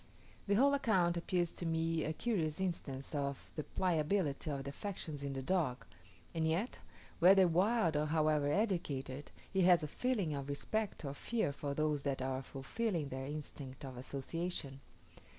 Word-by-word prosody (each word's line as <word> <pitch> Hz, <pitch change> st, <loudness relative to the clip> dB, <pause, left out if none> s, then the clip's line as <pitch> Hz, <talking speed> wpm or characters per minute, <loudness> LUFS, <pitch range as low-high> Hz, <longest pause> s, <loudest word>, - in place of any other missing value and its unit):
The 200 Hz, -, +3 dB
whole 280 Hz, +6 st, +5 dB
account 190 Hz, -11 st, +3 dB
appears 175 Hz, 0 st, 0 dB
to -, -, -6 dB
me 165 Hz, 0 st, +1 dB
a 155 Hz, -, -1 dB
curious 160 Hz, -4 st, -1 dB
instance 155 Hz, -8 st, -3 dB
of 140 Hz, -2 st, -3 dB
the 155 Hz, -, -2 dB
pliability 160 Hz, -3 st, 0 dB
of 140 Hz, -2 st, -2 dB
the 140 Hz, -, -4 dB
affections 160 Hz, -4 st, -5 dB
in 140 Hz, -1 st, -2 dB
the 135 Hz, -1 st, -4 dB
dog; 150 Hz, -7 st, 0 dB, 0.5 s
and 160 Hz, -1 st, +1 dB
yet, 180 Hz, +10 st, 0 dB, 0.4 s
whether 190 Hz, +1 st, +8 dB
wild 180 Hz, 0 st, +3 dB
or 150 Hz, +1 st, +2 dB
however 155 Hz, -2 st, +2 dB
educated, 150 Hz, -, -1 dB, 0.2 s
he 190 Hz, -, +3 dB
has 175 Hz, -2 st, +6 dB
a -, -, -1 dB
feeling 205 Hz, -, 0 dB
of 140 Hz, -1 st, -4 dB
respect 200 Hz, +6 st, -1 dB
or 140 Hz, -, -3 dB
fear 220 Hz, 0 st, -1 dB
for 140 Hz, 0 st, -3 dB
those 150 Hz, -1 st, +1 dB
that 140 Hz, -1 st, -1 dB
are 130 Hz, 0 st, -1 dB
fulfilling 150 Hz, -, -2 dB
their 130 Hz, 0 st, -4 dB
instinct 140 Hz, -2 st, -6 dB
of 130 Hz, -1 st, -7 dB
association. 140 Hz, +2 st, -4 dB
155 Hz, 165 wpm, -36 LUFS, 140-185 Hz, 0.5 s, whether